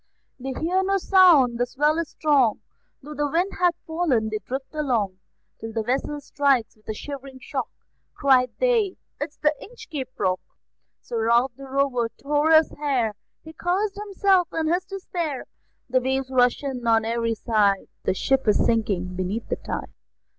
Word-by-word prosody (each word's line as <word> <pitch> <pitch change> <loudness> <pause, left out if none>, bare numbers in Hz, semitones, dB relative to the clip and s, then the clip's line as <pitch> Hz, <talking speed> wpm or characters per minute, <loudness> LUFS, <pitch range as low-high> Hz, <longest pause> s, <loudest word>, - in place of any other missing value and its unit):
They 265 +1 -4
hear 360 +4 +1
no 390 +1 +2
sound; 340 -11 +5
the 245 - +1
swell 300 +5 +1
is 335 - -2
strong; 275 -8 +2 0.4
Though 300 +2 -8
the 295 0 -1
wind 350 +6 +1
hath 355 -2 +3
fallen, 315 -10 0
they 215 - -2
drift 265 +6 -5
along, 235 -11 -1 0.4
Till 225 0 -7
the 225 -1 -1
vessel 270 +5 -1
strikes 275 -4 +1
with 215 0 -20
a - - 0
shivering 275 +1 -8
shock; - - -4 0.5
Cried 255 -2 +4
they: 460 -6 +2 0.2
"It 290 - -2
is - - -31
the 300 0 +2
Inchcape 390 - -7
Rock!" 185 -1 +1 0.6
Sir 225 -1 -2
Ralph 240 +3 +4
the 275 +1 -10
Rover 260 -4 +1
tore 295 +2 +1
his 315 -1 +6
hair, 260 -7 0 0.3
He 320 - -11
cursed 380 +5 0
himself 390 -3 +2
in 320 0 0
his 365 +1 0
despair: 350 -7 -4 0.4
The 255 0 +2
waves 265 +1 -1
rush 250 +1 +3
in 255 -4 -4
on 225 -1 +4
every 230 0 0
side; 210 -4 +1
The - - 0
ship 270 +5 +1
is 210 - +3
sinking 195 -6 0
beneath 190 +5 -3
the - - -1
tide. - - -6
270 Hz, 170 wpm, -24 LUFS, 235-320 Hz, 0.6 s, his